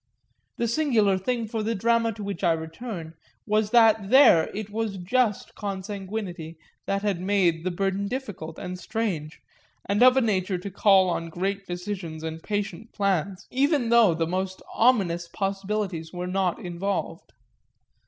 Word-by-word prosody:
The 235 - 0
singular 230 -7 +2
thing 230 +3 -2
for 225 0 -3
the 225 +2 -1
drama 230 +2 +2
to 210 0 -8
which 200 0 -5
I 170 -2 +4
return 165 +1 -6 0.3
was 215 -1 +1
that 220 -3 +4
there 245 - +7
it 210 0 -5
was 215 -2 -2
just 210 +4 0
consanguinity 195 -4 -5 0.3
that 200 +1 -1
had 200 -4 0
made 180 -4 +2
the 185 - 0
burden 195 +2 -1
difficult 200 -11 -6
and 180 -1 -6
strange 180 -9 -3 0.4
and 205 +3 0
of 255 +1 +7
a - - +5
nature 190 -4 0
to 195 +3 -7
call 195 -1 +5
on 165 -1 -3
great 195 +4 -3
decisions 175 -3 -5
and 160 0 -5
patient 205 +2 -4
plans, 195 -1 -1
even 275 -1 +2
though 230 -7 +5
the 165 0 0
most 185 +2 -3
ominous 190 -8 +2
possibilities 195 -3 -3
were 180 0 -5
not 185 -1 0
involved. 180 +3 -4
195 Hz, 155 wpm, -26 LUFS, 180-220 Hz, 0.4 s, there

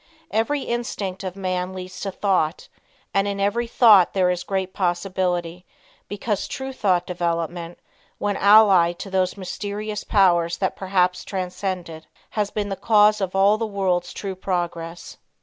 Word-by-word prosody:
Every 230 +7 0
instinct 205 -6 -4
of 185 -1 -5
man 185 -1 -2
leads 185 0 -8
to 195 - -3
thought, 185 -5 0 0.4
and 195 0 +2
in 200 0 -3
every 205 +4 0
thought 215 -7 +5
there 185 -2 +3
is 180 -1 -2
great 190 0 -3
possibility 180 -2 -1 0.4
because 205 0 -3
true 265 0 -5
thought 185 -8 +1
development, 170 -1 -3 0.4
when 205 -1 -1
allied 195 -5 +5
to 195 - -8
those 185 0 0
mysterious 205 +2 -5
powers 175 -5 +2
which 190 - +1
perhaps 185 -1 0
transcend 185 -1 -4
it, 160 -1 -11 0.2
has 210 -2 -1
been 205 -1 -3
the 195 - -2
cause 210 +1 +4
of 190 -1 -2
all 200 +2 +4
the 225 - -1
world's 185 -4 -1
true 195 -2 -5
progress. 175 -2 -4
190 Hz, 150 wpm, -23 LUFS, 180-205 Hz, 0.4 s, thought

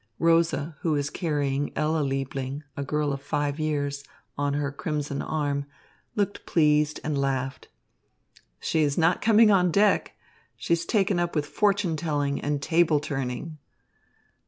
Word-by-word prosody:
Rosa, 165 -2 +2
who 160 - 0
was 145 0 -1
carrying 145 -4 -1
Ella 155 +1 +1
Liebling, 135 0 -3
a 140 - -3
girl 150 0 -1
of 140 - -5
five 145 +1 -2
years, 145 -2 -1 0.3
on 145 0 -1
her 145 -1 -1
crimson 145 -1 -3
arm, 145 -2 -2 0.5
looked 205 -2 -2
pleased 150 -2 +3
and 150 -1 -1
laughed. 135 -1 -2 0.9
"She 160 - 0
is 145 -2 +1
not 170 +1 +3
coming 220 0 +6
on 180 -3 +4
deck. 200 +4 +2 0.4
She's 170 0 -1
taken 195 -4 +2
up 175 -1 -1
with 150 -1 +1
fortune 200 -1 +1
telling 145 -3 -1
and 145 -1 -2
table 160 -1 +3
turning." 145 +2 -4
150 Hz, 140 wpm, -26 LUFS, 140-165 Hz, 0.9 s, coming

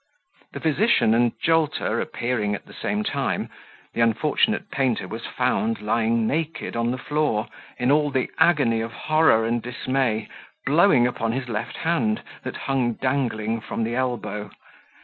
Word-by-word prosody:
The - - -5
physician 160 - +3
and 120 0 +3
Jolter 155 -8 +1
appearing 110 -4 -1
at - - -9
the - - -14
same 210 +1 -2
time, 140 -9 -2 0.4
the - - -1
unfortunate 150 - +1
painter 130 -4 0
was - - -6
found 115 +1 0
lying 115 +1 +1
naked 160 +3 -2
on 115 0 0
the 125 - -1
floor, 145 -5 0 0.3
in 125 +2 +2
all 150 0 +3
the 130 -2 -1
agony 125 -10 +4
of 115 0 -4
horror 155 -8 +3
and 120 +1 0
dismay, 125 -1 -1 0.4
blowing 150 -4 +5
upon 115 -2 -1
his 130 0 -3
left 115 -1 -4
hand, 215 +7 0 0.2
that - - -6
hung 130 -3 +1
dangling 115 -4 -1
from 115 - -3
the 115 +1 -2
elbow. 110 -5 -2
125 Hz, 150 wpm, -24 LUFS, 115-150 Hz, 0.4 s, blowing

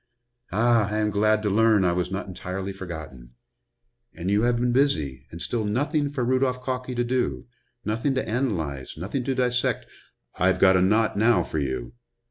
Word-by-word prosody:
"Ah, 115 +1 +3
I 105 - -1
am 105 0 +1
glad 105 +1 +2
to 105 - +1
learn 110 -2 +4
I 90 - +3
was 90 +1 -1
not 95 +1 -3
entirely 95 +1 -5
forgotten. 80 -10 -9 0.8
And 90 +3 -3
you 105 +1 +3
have 120 +1 +2
been 120 +1 +1
busy, 80 - 0
and 85 - -9
still 110 +6 -2
nothing 145 +8 0
for 135 -4 -2
Rudolph 130 0 +1
Calkey 130 -1 -3
to 120 - +1
do, 125 +1 -1 0.4
nothing 115 +6 0
to 130 - -1
analyze, 85 - -2
nothing 100 - -3
to 135 -1 0
dissect 125 -1 0 0.3
" - - -25
"I've 95 +1 +3
got 95 -1 +5
a 90 - +4
knot 105 +3 +2
now 115 +3 +4
for 80 - -3
you." 65 - -3
105 Hz, 185 wpm, -25 LUFS, 90-125 Hz, 0.8 s, got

